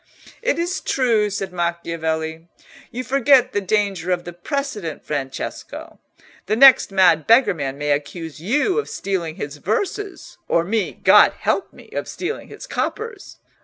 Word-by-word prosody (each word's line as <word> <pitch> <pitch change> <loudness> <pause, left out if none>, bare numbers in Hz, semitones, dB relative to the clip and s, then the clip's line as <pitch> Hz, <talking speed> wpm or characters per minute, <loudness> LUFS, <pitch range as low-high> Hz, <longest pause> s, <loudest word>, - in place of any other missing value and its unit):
"It - - 0
is 350 +3 -2
true," 230 -5 +1
said 195 -2 -4
Macchiavelli. 165 -2 -3 0.4
"You 250 +1 -5
forget 270 +1 +4
the 205 - 0
danger 195 -3 -1
of 180 -1 0
the 175 - -8
precedent, 210 - -4
Francesco. 135 -3 -5 0.5
The 215 - +1
next 265 -3 +7
mad 180 -5 +4
beggarman 165 - +3
may 145 0 -1
accuse 150 +2 -3
you 295 - +1
of 440 - -4
stealing 175 -5 -3
his 145 -2 -6
verses, 380 - -3
or 165 - +2
me, 205 +2 -1
God - - +6
help 390 - -1
me! - - -17
of - - -4
stealing 395 +5 -5
his - - -10
coppers. 440 -3 -4
195 Hz, 145 wpm, -21 LUFS, 165-265 Hz, 0.5 s, next